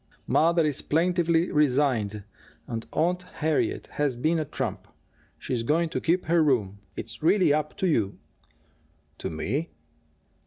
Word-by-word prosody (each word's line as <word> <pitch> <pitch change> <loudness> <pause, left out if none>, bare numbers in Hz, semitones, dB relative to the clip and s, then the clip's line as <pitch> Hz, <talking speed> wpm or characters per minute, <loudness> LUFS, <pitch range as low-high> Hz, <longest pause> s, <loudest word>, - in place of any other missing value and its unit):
"Mother 165 0 +3
is 150 -3 -1
plaintively 170 +1 +2
resigned 125 -8 +1 0.4
and 115 -1 -5
Aunt 175 +4 +1
Harriet 160 -4 -1
has 145 -4 -1
been 160 +7 +1
a 155 - -1
trump. - - -4 0.5
She's 125 -3 -2
going 160 +8 +1
to - - -3
keep 175 +3 +1
her 165 +1 +3
room. 105 -9 +1 0.2
It's 110 0 -7
really 175 -1 +4
up 150 0 -2
to 190 - +1
you." 110 - +1 1.0
"To - - -3
me?" 125 - -2
150 Hz, 140 wpm, -26 LUFS, 120-170 Hz, 1.0 s, really